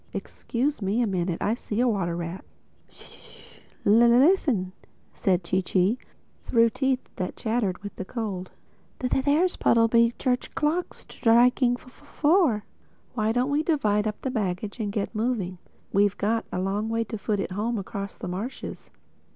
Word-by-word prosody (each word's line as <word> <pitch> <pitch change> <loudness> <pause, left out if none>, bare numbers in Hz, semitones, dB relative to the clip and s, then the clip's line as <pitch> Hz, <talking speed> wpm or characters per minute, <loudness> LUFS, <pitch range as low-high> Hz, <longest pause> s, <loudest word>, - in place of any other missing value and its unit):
—Excuse 270 +3 -2
me 200 +4 0
a 245 - +3
minute: 180 -4 -1
I 210 - +2
see 225 -2 -4
a 250 - +3
water 190 -7 0
rat." 170 +2 -5 0.5
"Sh!—Listen!" 235 - +1 0.4
said 185 -2 +1
Chee 185 +3 0
Chee 190 +6 +1 0.4
through 230 -1 +3
teeth 265 0 0
that 180 -1 -3
chattered 220 -5 -1
with 205 - -7
the - - -3
cold. 195 -4 -4 0.5
"There's 285 +8 +1
Puddleby 230 0 +4
church 250 -1 -1
clock 320 +4 0
striking 245 +1 +3
four. 290 - +1 0.5
Why 220 -2 +1
don't 250 +4 +1
we 290 +2 +2
divide 220 -10 +1
up 210 - -4
the 265 - -1
baggage 205 -1 -3
and 210 -2 -2
get 205 +1 -2
moving. 215 -6 -2 0.3
We've 200 0 +3
got 225 +2 0
a - - -2
long 200 +4 -1
way 230 0 0
to 225 - -6
foot 205 0 -1
it 195 - -3
home 220 +5 -1
across 200 0 -5
the - - -7
marshes." 200 +9 -6
225 Hz, 150 wpm, -26 LUFS, 195-250 Hz, 0.5 s, Puddleby